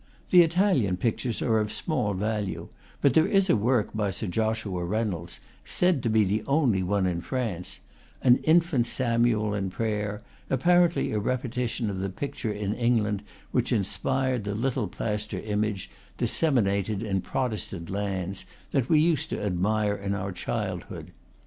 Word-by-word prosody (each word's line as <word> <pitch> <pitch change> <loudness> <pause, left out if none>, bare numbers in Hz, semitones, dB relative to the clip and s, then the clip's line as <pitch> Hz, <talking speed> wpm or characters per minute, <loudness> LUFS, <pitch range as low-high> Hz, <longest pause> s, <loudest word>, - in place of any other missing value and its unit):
The 180 - +9
Italian 165 - +2
pictures 115 +3 -1
are 110 -2 +3
of 105 -1 -1
small 105 - -1
value; 105 0 -2 0.3
but 140 - +4
there 160 - +5
is 195 -2 +3
a - - +5
work 115 +1 +1
by 105 -2 0
Sir 95 +4 -4
Joshua 110 -2 -1
Rey 105 +6 0
nolds, 85 -5 -5 0.2
said 180 -6 +1
to 115 - 0
be 110 -1 +4
the 105 +2 0
only 135 -9 +2
one 95 +1 +1
in 85 -2 -1
France, 110 -6 -4 0.4
an 125 -1 +6
infant 160 -7 +3
Samuel 115 -4 +1
in 100 -2 -1
prayer, 105 0 -2 0.3
apparently 175 +5 +3
a 105 - 0
repetition 125 0 -2
of 95 - -4
the 95 +1 -2
pic 140 +9 -5
ture 110 - -2
in 105 -1 -2
England 110 -4 +1 0.3
which 125 0 0
inspired 130 +3 0
the 100 0 -3
little 120 -1 -1
plaster 105 +3 -3
im 105 0 -1
age, 105 -3 -3 0.3
disseminated 105 - +1
in 95 -4 -1
Protestant 110 -10 -3
lands, 95 -2 -3 0.3
that 130 -2 0
we 155 - +5
used 160 -2 +2
to - - -3
admire 105 +2 +1
in 100 0 -3
our 95 0 -3
childhood. 90 - -4
110 Hz, 160 wpm, -27 LUFS, 100-130 Hz, 0.4 s, The